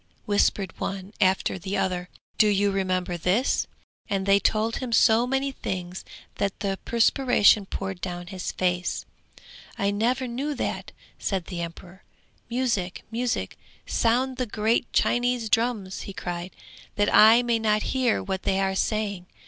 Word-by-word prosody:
whispered 205 -3 +1
one 195 +1 -4
after 190 0 +2
the 190 +3 -3
other; 180 -1 -1 0.3
'Do 215 - +6
you 205 0 +2
remember 185 -2 -1
this?' 190 +10 +1 0.4
and 195 -2 -1
they 200 0 +5
told 220 +2 +1
him 255 -2 -4
so 230 +1 +4
many 270 +1 0
things 180 -7 -5 0.3
that 200 -1 -2
the 195 -2 -2
perspiration 230 -4 +4
poured 190 -2 -5
down 175 -1 -4
his 185 0 -5
face. 180 0 -1 0.7
'I 200 0 +1
never 240 +6 0
knew 275 +5 -3
that,' - - -3 0.3
said 190 -4 -2
the 175 -3 -5
emperor. 175 +2 -8 0.5
'Music, 230 -7 -1
music, 240 +1 -2 0.3
sound 250 +3 +1
the 255 -1 -1
great 220 +3 0
Chinese 245 -2 +1
drums!' 225 -5 0
he 195 - -7
cried, 175 -1 -5 0.5
'that 205 0 +1
I 225 +3 +8
may 235 -1 +1
not 215 -1 +1
hear 255 -4 +1
what 190 -1 -3
they 190 - 0
are 195 0 +1
saying.' 200 -2 -1
205 Hz, 150 wpm, -25 LUFS, 190-235 Hz, 0.7 s, I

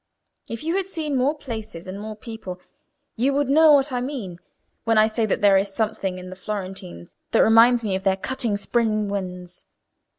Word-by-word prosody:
If 230 +3 -6
you 330 +4 0
had 385 -1 -2
seen 315 -6 -3
more 265 +4 +2
places 220 - -7
and 190 +1 -7
more 215 0 -6
people, 215 -5 -8 0.6
you 265 +5 +1
would 285 -2 +1
know 310 +2 +7
what 280 0 +3
I 250 -1 -1
mean 240 -10 -5 0.4
when 225 -1 +2
I 215 - +7
say 220 0 0
that - - -1
there 200 -1 +6
is 195 +1 0
something 210 -4 -1
in 180 0 -9
the - - -7
Florentines 185 - -7 0.2
that - - +5
reminds 230 +2 +6
me 205 -3 -1
of 190 - -1
their 190 0 +1
cutting 230 -1 -2
spring 215 -1 0
winds. 180 -2 -6
220 Hz, 195 wpm, -23 LUFS, 190-255 Hz, 0.6 s, know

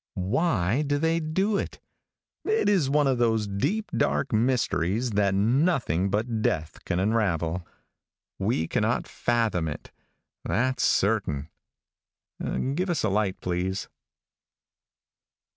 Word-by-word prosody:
Why 110 - +1
do 145 -1 0
they 165 +2 +1
do 190 +6 0
it? - - -5 0.6
It 435 +1 +1
is 185 -10 +3
one 145 +1 +3
of 130 -3 +1
those 110 -2 +2
deep, 145 - -1
dark 135 - 0
mysteries 115 -2 +1
that 100 -2 +2
nothing 115 - +2
but 110 +3 -1
death 80 -6 -2
can 85 - -1
unravel. 90 -5 0 0.7
We 95 -5 0
cannot - - 0
fathom 115 -8 0
it, 75 - -7 0.5
that's 130 +4 0
certain. 95 -8 +1 1.2
(Give 180 +5 -1
us 170 -4 0
a 110 - +2
light, 100 -1 0
please.) 90 +2 -2
110 Hz, 115 wpm, -26 LUFS, 95-140 Hz, 1.2 s, is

